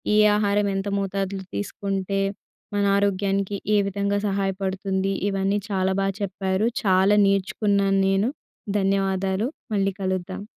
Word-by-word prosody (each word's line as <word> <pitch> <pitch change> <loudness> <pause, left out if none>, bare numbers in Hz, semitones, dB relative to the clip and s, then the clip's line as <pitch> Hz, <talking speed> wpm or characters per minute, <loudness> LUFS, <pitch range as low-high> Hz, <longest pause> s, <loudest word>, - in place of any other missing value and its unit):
ఏ - - +4 0.2
ఆహారం 205 -1 +2
ఎంత 195 +1 -2
మోతాదులో 195 0 -3
తీసుకుంటే 195 -1 -2 0.5
మన 200 0 +2
ఆరోగ్యానికి 200 0 0 0.2
ఏ - - +5
విధంగా 200 +1 -1
సహాయపడుతుంది. 195 0 -1 0.2
ఇవన్నీ 195 +1 0
చాలా 190 -1 +1
బాగా 195 -1 -1
చెప్పారు 190 +1 -1 0.2
చాలా 190 +1 +4
నేర్చుకున్నాను 195 0 +1
నేను. 195 +4 +2 0.5
ధన్యవాదాలు. 195 +2 0 0.3
మళ్ళీ 195 -1 +1
కలుద్దాం. 185 +1 -3
195 Hz, 115 wpm, -24 LUFS, 190-200 Hz, 0.5 s, ఏ